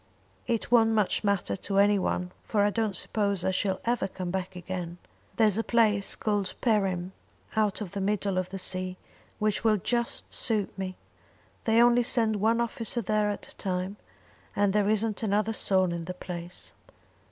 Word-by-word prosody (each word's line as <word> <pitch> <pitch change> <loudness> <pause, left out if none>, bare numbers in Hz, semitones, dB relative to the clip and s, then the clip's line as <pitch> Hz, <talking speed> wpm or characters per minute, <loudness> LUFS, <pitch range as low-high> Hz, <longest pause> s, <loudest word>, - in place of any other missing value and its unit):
"It 230 -1 -1
won't 225 -2 +5
much 210 -1 +1
matter 200 -3 +1
to 195 +1 -3
any 205 0 +5
one, 180 -1 -1
for 210 - +1
I 205 - +3
don't 220 -3 -1
suppose 200 0 -1
I 190 - +2
shall 190 0 0
ever 240 -2 +1
come 185 -2 -5
back 190 0 -3
again. 180 -1 -5 0.4
There's 215 -2 +4
a - - +1
place 215 -4 +2
called 205 -3 -1
Perim, 190 -6 +1 0.4
out 215 -1 +1
in - - -5
the 195 +2 -4
middle 200 -1 0
of 185 0 -3
the 195 - -5
sea, 185 0 -3 0.4
which 210 0 0
will 220 -2 +4
just 235 +5 -2
suit 215 -4 0
me. 190 -1 -4 0.7
They 225 0 +4
only 240 0 +5
send 225 -2 +1
one 225 +3 +2
officer 235 0 -1
there 210 +1 +1
at 205 - -5
a - - -11
time, 185 +1 -2 0.6
and 200 -1 +2
there 205 -1 +2
isn't 215 0 0
another 215 +1 +1
soul 185 -4 +2
in 170 -1 -4
the 180 +1 -5
place." 175 -1 -6
205 Hz, 175 wpm, -28 LUFS, 185-220 Hz, 0.7 s, won't